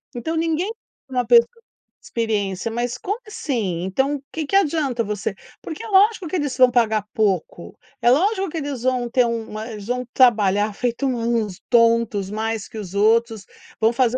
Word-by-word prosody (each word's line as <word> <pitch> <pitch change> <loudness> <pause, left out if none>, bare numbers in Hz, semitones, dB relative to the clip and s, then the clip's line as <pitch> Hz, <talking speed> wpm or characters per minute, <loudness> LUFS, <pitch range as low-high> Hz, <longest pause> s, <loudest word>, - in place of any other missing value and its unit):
Então 280 +8 -3
ninguém 330 +5 0 0.4
por 265 - -9
uma 250 -1 +1
pessoa 235 0 +6 0.5
experiência 210 -3 -2
mas 240 +2 -3
como 410 +3 -3
assim? 220 - -3
Então 265 +10 0
o 275 - -17
que 320 -1 -3
que 390 - -2
adianta 290 -9 +1
você 210 -1 -3 0.3
porque 320 - -7
é - - -7
lógico 405 -2 +3
que 315 - -4
eles 290 -7 -2
vão 255 -1 +7
pagar 220 -4 +1
pouco, 190 -5 -1 0.2
é 240 - +5
lógico 385 - +2
que 325 - -6
eles 280 -5 -4
vão 250 -2 0
ter 250 +1 +3
uma 225 -1 -4
eles 210 -2 -8
vão 250 +1 -2
trabalhar 210 -4 +3
feito 240 +5 -2
uns 230 -6 -1
tontos 230 -4 +3
mais 220 0 -3
que - - -11
os 195 -4 -7
outros, 220 0 +2 0.3
vão 225 +1 +3
fazer 250 0 +2
235 Hz, 180 wpm, -21 LUFS, 215-275 Hz, 0.5 s, vão